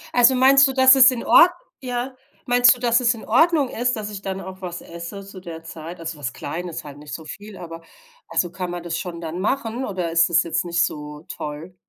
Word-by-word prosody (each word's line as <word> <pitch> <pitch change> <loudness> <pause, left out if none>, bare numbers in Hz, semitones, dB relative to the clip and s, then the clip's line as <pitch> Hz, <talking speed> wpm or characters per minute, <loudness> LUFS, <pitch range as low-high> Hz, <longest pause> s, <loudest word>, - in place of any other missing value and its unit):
Also 245 +1 +6
meinst 270 +2 +6
du, 265 - -3
dass 260 0 +7
es 260 -1 +8
in 250 -3 -4
Ordn 355 +1 +6 0.3
ja 250 +1 -4 0.3
meinst 245 +1 +5
du, 245 - -14
dass 235 -1 +2
es 245 -1 +2
in 225 - -11
Ordnung 295 +3 +3
ist, 245 +1 -1
dass 210 -2 -5
ich 200 - -7
dann 195 0 -5
auch 190 +1 -10
was 175 -1 -6
esse 170 +4 -9
zu 195 -1 -11
der 165 -2 -9
Zeit, 165 +2 -9
also 165 -2 -6
was 125 -4 -4
Kleines, 170 +3 -6
halt 145 -1 -11
nicht 150 0 -10
so 160 - -7
viel, 205 +5 -10
aber 165 -1 -9 0.5
also 175 - -1
kann 180 0 -5
man 175 -1 -6
das 170 -1 -3
schon 170 -2 -6
dann 165 +1 -5
machen 240 +3 -2
oder 180 -6 -3
ist 165 +1 +3
das 170 - +3
jetzt 170 +1 -2
nicht 170 0 +2
so 150 +1 -8
toll? 155 +4 -7
185 Hz, 230 wpm, -22 LUFS, 165-245 Hz, 0.5 s, es